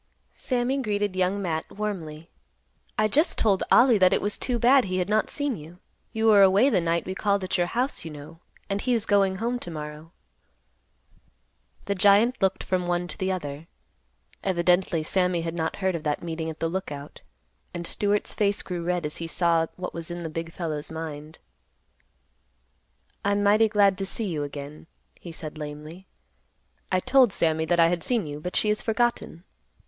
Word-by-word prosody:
Sammy 255 +1 -1
greeted 205 -4 -1
Young 185 +2 0
Matt 160 -3 -3
warmly. 170 -6 -5 0.7
"I 215 - +3
just 300 - +2
told 200 -4 +2
Ollie 240 -3 +6
that 185 -1 +5
it - - +3
was 205 0 -1
too 250 -2 -1
bad 250 +2 +5
he 185 -1 -2
had 180 +1 -1
not 215 0 +1
seen 285 -3 -1
you. 165 +1 -12 0.3
You 225 -1 -1
were 210 -2 +7
away 200 +8 +5
the 190 - +2
night 170 0 0
we 185 - -4
called 200 0 0
at 185 - -1
your 175 -1 +1
house, 250 +8 -1
you 165 - -6
know; 150 +2 -11 0.3
and 200 0 -2
he 250 -1 +1
is 225 -2 0
going 195 -2 +3
home 235 +5 -2
to 175 - -7
morrow." 150 0 -8 1.7
The 200 - 0
giant 205 +6 +4
looked 190 0 +1
from 180 -1 -1
one 175 0 -1
to - - -8
the 190 -1 0
other. 150 -3 -5 0.8
Evidently 175 -2 +1
Sammy 180 +1 +1
had 165 0 -4
not 160 -1 -2
heard 190 -1 0
of 170 - -3
that 150 0 -2
meeting 160 -1 -4
at 160 - -8
the 165 - 0
Lookout, 150 -5 -6 0.5
and 175 0 -6
Stewart's 205 +3 0
face 200 -1 0
grew 175 -2 -4
red 175 -1 -1
as 150 - -3
he 165 - -4
saw 165 -1 +1
what 180 0 -6
was 165 0 -6
in 175 0 -5
the 165 - -4
big 165 +1 -5
fellow's 155 -4 -4
mind. 155 -1 -7 1.9
"I'm 200 0 +1
mighty 215 +2 +4
glad 200 -3 +3
to 195 - -2
see 225 - -2
you 165 -6 -2
again," 145 +2 -7 0.3
he 170 - -9
said 155 -1 -7
lamely. 150 +5 -8 0.8
"I 185 - +3
told 255 -2 +4
Sammy 160 -2 +1
that 170 +2 +1
I 165 0 +6
had 175 -1 -1
seen 235 -3 0
you, 145 0 -6
but 180 +4 -5
she 210 - +2
has 210 - 0
forgotten." 230 -7 -1
180 Hz, 190 wpm, -25 LUFS, 165-205 Hz, 1.9 s, were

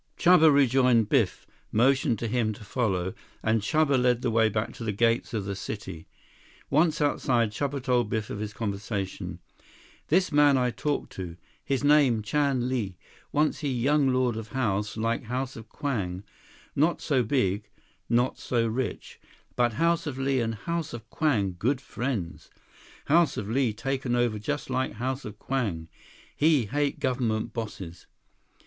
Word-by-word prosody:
Chuba 170 -3 +6
rejoined 125 -5 +4
Biff, 115 -10 +1 0.3
motioned 130 +1 +3
to 115 - -3
him 110 -1 0
to 105 - -12
follow, 95 -5 -1 0.3
and 110 0 +2
Chuba 145 +2 +2
led 125 -1 +2
the 120 - +1
way 110 0 +4
back 105 +1 -2
to - - -8
the 110 - -1
gates 115 +3 +1
of 110 -5 -2
the 100 0 -3
city. 95 -4 -7 0.6
Once 160 +1 +3
outside, 120 -6 +1
Chuba 140 +3 -3
told 125 -4 +1
Biff 110 -1 -2
of 100 - -4
his 105 0 -4
conversation. 100 -4 -4 0.7
"This 180 +3 +2
man 145 -2 +5
I 125 -1 +1
talk 145 +4 -2
to. 90 -3 -7 0.3
His 135 0 -1
name 145 -7 +4
Chan 135 0 +1
Li. 110 -8 -2 0.3
Once 150 +1 +1
he 145 -3 -2
young 135 +3 +2
lord 125 -3 +1
of 110 -1 -6
house 105 -5 -1
like 115 +2 -1
House 130 +3 -3
of 115 -1 -10
Kwang. 105 - -3 0.5
Not 160 +5 +2
so 140 -5 +1
big. 105 -4 0 0.4
Not 120 +2 +1
so 120 -2 0
rich. 115 +1 -3 0.4
But 120 -2 +2
House 165 +4 +1
of 140 -3 -4
Li 135 0 +1
and 115 -1 -1
House 170 +5 -3
of 115 -2 -8
Kwang 100 - +1
good 130 +4 +1
friends. 120 -11 -4 0.6
House 165 +2 +3
of 100 - -3
Li 125 +1 +1
taken 130 +2 -2
over 120 -3 +1
just 145 +5 -3
like 130 +1 0
House 130 +4 -3
of 105 0 -8
Kwang. 105 -12 -2 0.5
He 150 -5 +3
hate 145 +6 -1
government 120 -4 -1
bosses." 100 -7 -6
120 Hz, 160 wpm, -27 LUFS, 110-140 Hz, 0.7 s, Chuba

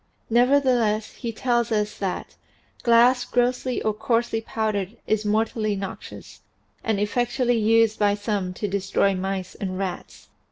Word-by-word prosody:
Nevertheless 240 -4 +3
he 235 -3 -5
tells 235 0 0
us 210 -1 0
that 195 -2 -3 0.5
"glass 245 +1 +5
grossly 245 +1 0
or 215 - +1
coarsely 230 +1 0
powdered 215 -2 -2
is 215 0 0
mortally 215 0 0
noxious, 195 -1 -8 0.4
and 220 -3 0
effectually 245 +3 +1
used 225 0 +3
by 205 -1 +3
some 205 -3 -2
to 210 - -3
destroy 195 0 +1
mice 190 0 -3
and 185 -2 -5
rats." 190 -2 -6
220 Hz, 130 wpm, -24 LUFS, 205-240 Hz, 0.5 s, glass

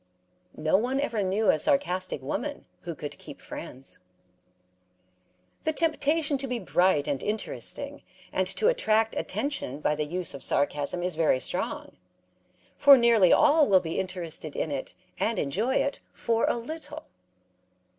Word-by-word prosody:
'No 155 +4 +2
one 255 +4 -1
ever 235 -7 -1
knew 200 +3 +2
a 155 - 0
sarcastic 185 - 0
woman - - -4 0.2
who - - -4
could - - -7
keep - - -10
friends. 135 +2 -9 1.6
The 315 - 0
temptation 305 -2 +1
to 270 - -3
be 250 -1 -2
bright 175 -4 +2
and 140 - -1
interesting 210 +1 -3 0.3
and - - +1
to 440 - 0
attract 225 - +2
attention 275 - -3
by 150 - +1
the 150 0 -2
use 175 +2 -4
of 135 - -7
sarcasm 145 +4 0
is 180 0 -1
very 155 -5 +2
strong, 180 - -2 0.8
for 285 -1 +8
nearly 230 -7 +5
all 300 0 +5
will 190 -2 +6
be 165 -1 -3
interested 175 -5 -4
in 155 - -2
it 135 -2 -5 0.2
and 225 0 0
enjoy 205 - 0
it 280 - 0
for 230 -1 0
a - - +2
little. 310 +8 -7
195 Hz, 145 wpm, -27 LUFS, -, 1.6 s, for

